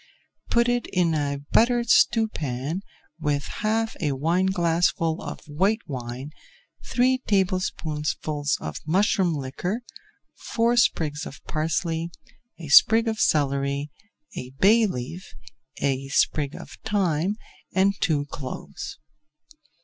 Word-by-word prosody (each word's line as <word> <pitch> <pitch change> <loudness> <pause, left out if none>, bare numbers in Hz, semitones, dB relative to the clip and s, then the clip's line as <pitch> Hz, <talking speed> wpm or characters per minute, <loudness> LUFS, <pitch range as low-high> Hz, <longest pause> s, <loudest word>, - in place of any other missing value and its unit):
Put 235 0 +3
it 245 0 0
in 175 -3 +1
a 140 -2 -1
buttered 235 0 +3
stewpan 160 - +2 0.4
with 145 -2 0 0.2
half 220 +1 0
a 145 -4 +1
wineglassful 170 +1 +1
of - - -7
white 195 +9 0
wine, 130 0 -6 0.5
three 255 +1 +2
tablespoonfuls 155 -6 0
of 80 -1 -5
mushroom 190 0 +2
liquor, 165 - -3 0.5
four 235 +1 0
sprigs 155 -11 +1
of - - -11
parsley, 165 +1 -1 0.5
a 165 - -8
sprig 225 +10 +7
of 220 -1 -1
celery, 140 0 +1 0.4
a 125 - -6
bay 220 +3 +5
leaf, 165 +3 -6 0.4
a 135 -1 -1
sprig 140 +1 +1
of - - -11
thyme, 195 -3 +1 0.4
and 195 +1 +3
two 155 -8 +1
cloves. 135 -2 -7
165 Hz, 110 wpm, -25 LUFS, 145-210 Hz, 0.5 s, sprig